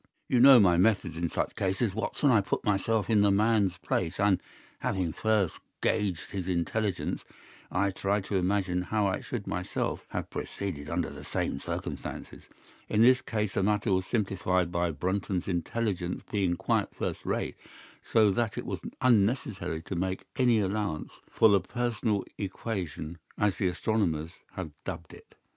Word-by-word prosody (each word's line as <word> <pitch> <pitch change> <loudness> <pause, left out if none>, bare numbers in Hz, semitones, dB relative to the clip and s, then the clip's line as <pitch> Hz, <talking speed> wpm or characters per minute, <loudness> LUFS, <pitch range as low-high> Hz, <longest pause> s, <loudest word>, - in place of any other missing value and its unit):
"You 125 - +3
know 130 0 +10
my 90 -5 +5
methods 95 -4 +2
in 85 0 -1
such - - -2
cases, 95 +2 0
Watson. 120 +6 +1
I 110 -4 +5
put 95 - -2
myself 105 +1 +1
in 110 -3 +4
the 100 - +5
man's 100 -2 +3
place 90 -1 -2
and, 100 -2 +3 0.4
having 90 -4 -1
first 110 -5 +1 0.2
gauged 100 -6 0
his 95 -3 -4
intelligence, 95 +3 -1 0.5
I 100 +2 +1
try 100 +2 0
to 100 +1 -4
imagine 95 -1 +1
how 105 +3 0
I 95 - 0
should - - -5
myself - - -3
have - - -4
proceeded 75 -8 -5
under - - -1
the - - -9
same - - -2
circumstances. - - -6 0.4
In 110 - +4
this 130 +1 +6
case 105 -5 -2
the - - +1
matter 105 +1 +2
was 95 0 0
simplified 90 -5 0
by 85 0 +1
Brunton's 90 +4 -2
intelligence 90 0 -2
being 95 -5 +1
quite - - 0
first - - -3
rate, - - -2 0.5
so 110 -3 +4
that 115 +2 -1
it - - -3
was - - -3 0.2
unnecessary 105 -8 +2
to 95 - -6
make 95 +2 -2
any 120 -3 +4
allowance 100 -5 -2
for - - +5
the 100 -3 +5
personal 110 0 -1
equation, 90 -5 -4 0.2
as 105 -2 +1
the 95 - +1
astronomers 90 -5 0 0.2
have 90 -5 -5
dubbed 80 -1 -6
it. - - -16
100 Hz, 160 wpm, -29 LUFS, 90-110 Hz, 0.5 s, know